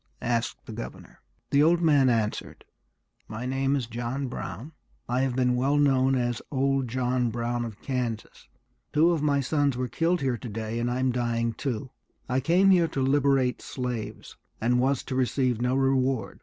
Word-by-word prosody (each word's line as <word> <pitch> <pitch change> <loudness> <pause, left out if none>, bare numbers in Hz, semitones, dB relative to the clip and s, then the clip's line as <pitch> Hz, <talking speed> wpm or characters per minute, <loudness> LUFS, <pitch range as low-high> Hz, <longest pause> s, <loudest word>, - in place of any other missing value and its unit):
asked 120 -1 -1
the - - -8
governor. 60 - -9 0.3
The 140 - +4
old 165 +3 +4
man 145 -6 +4
answered, 110 -3 -2 0.6
"My 110 +3 -6
name 135 +2 0
is 135 -4 -1
John 120 +4 -3
Brown; 130 +4 -6 0.4
I 125 +2 0
have 130 -2 0
been 125 -1 +2
well 135 +4 +2
known 135 -2 +3
as 120 -2 -1
old 135 -1 +1
John 125 0 0
Brown 120 +1 -2
of 110 -3 -8
Kansas. 125 -5 -4 0.5
Two 160 +3 +5
of 165 -3 0
my 145 -2 +2
sons 140 -1 +1
were 125 0 -1
killed 170 +7 0
here 130 -4 0
to 125 - -7
day, 110 +2 -4
and 120 +1 0
I'm 130 +1 +1
dying 115 -1 -1
too. 125 +1 -4 0.4
I 130 +1 +1
came 180 +8 +4
here 175 -3 +4
to 155 - -4
liberate 135 -2 +2
slaves, 125 -4 -5 0.2
and 120 +2 +2
was 130 +1 +1
to - - -5
receive 130 -2 +1
no 125 +1 +1
reward. 135 -4 +1
130 Hz, 175 wpm, -27 LUFS, 120-140 Hz, 0.6 s, Two